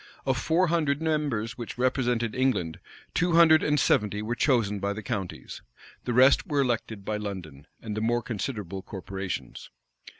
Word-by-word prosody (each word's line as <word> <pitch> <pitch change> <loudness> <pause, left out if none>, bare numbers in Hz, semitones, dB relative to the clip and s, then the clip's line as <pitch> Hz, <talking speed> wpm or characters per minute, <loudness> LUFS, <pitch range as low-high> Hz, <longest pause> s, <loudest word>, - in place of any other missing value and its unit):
Of 130 - +2
four 165 +7 +2
hundred 150 -4 +1
members 145 -8 -1
which 120 - -6
represented 125 -3 0
England, 125 -11 0 0.3
two 175 -1 +1
hundred 165 -2 +7
and 150 0 +2
seventy 105 -3 +1
were 115 +3 -2
chosen 115 -5 +1
by 100 +1 -1
the 110 +1 -7
counties. 100 -7 -5 0.4
The 120 - -1
rest 130 +3 +5
were 145 -2 +1
elected 115 -5 -2
by 110 - -1
London, 90 -8 -7 0.2
and 110 -2 -4
the 110 - -2
more 120 +1 +1
considerable 105 -5 -4
corporations. 95 -1 -6
115 Hz, 160 wpm, -27 LUFS, 100-135 Hz, 0.4 s, hundred